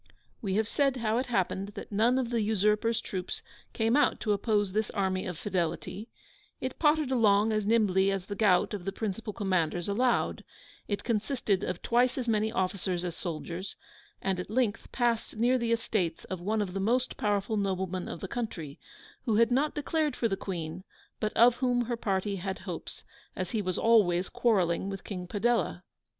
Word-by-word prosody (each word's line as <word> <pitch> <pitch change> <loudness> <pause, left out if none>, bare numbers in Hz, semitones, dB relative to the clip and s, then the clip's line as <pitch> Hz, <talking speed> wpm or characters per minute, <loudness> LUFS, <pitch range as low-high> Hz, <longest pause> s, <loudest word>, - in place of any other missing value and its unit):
We 195 -3 -1
have 215 0 +2
said 275 +1 +2
how 225 -1 +1
it 260 - -2
happened 195 -2 -1
that - - -8
none 230 +5 +3
of 250 -2 -1
the 235 -2 +1
Usurper's 215 +2 +2
troops 185 -2 -5 0.3
came 225 +1 +1
out 295 - +3
to 210 - +2
oppose 205 -1 +1
this 215 +2 0
Army 190 -2 -1
of 180 -3 -5
Fidelity: 185 +4 -3 0.5
it 260 0 -4
pottered 300 -3 +3
along 215 -3 +4
as 215 -1 0
nimbly 200 -4 +3
as 195 -2 -1
the 205 - -5
gout 200 -1 +3
of 200 -4 -4
the 195 - -1
principal 210 +1 -4
commanders 180 -4 0
allowed: 240 +5 +1 0.4
it 205 -1 -2
consisted 220 -3 0
of 180 -1 -3
twice 245 +2 +2
as 250 -2 -2
many 220 -1 +2
officers 185 -4 -1
as 175 -1 -4
soldiers: 175 +3 -5 0.5
and 190 -1 0
at 180 - -5
length 230 -1 0
passed 235 -3 0
near 245 +3 +3
the 235 -1 -1
estates 215 -6 0
of 185 -2 -5
one 210 +3 +1
of 185 -3 -6
the 195 - -2
most 245 +6 +1
powerful 205 -2 0
noblemen 190 -2 -1
of - - -6
the 190 - -4
country, 175 -11 -5 0.5
who 225 - +2
had 230 +2 +4
not 280 +5 +2
declared 300 -1 0
for 230 - +1
the 195 - 0
Queen, 175 -2 -5 0.4
but 215 -1 0
of 240 +1 +6
whom 250 -2 +2
her 240 +1 -1
party 200 -2 -1
had 190 +1 -3
hopes, - - -7 0.3
as 185 -1 -3
he 220 - 0
was 185 -2 -2
always 190 -6 +4
quarrelling 190 -5 +1
with 195 -1 -6
King 180 -3 -6
Padella. 220 -2 0
210 Hz, 185 wpm, -29 LUFS, 190-230 Hz, 0.5 s, of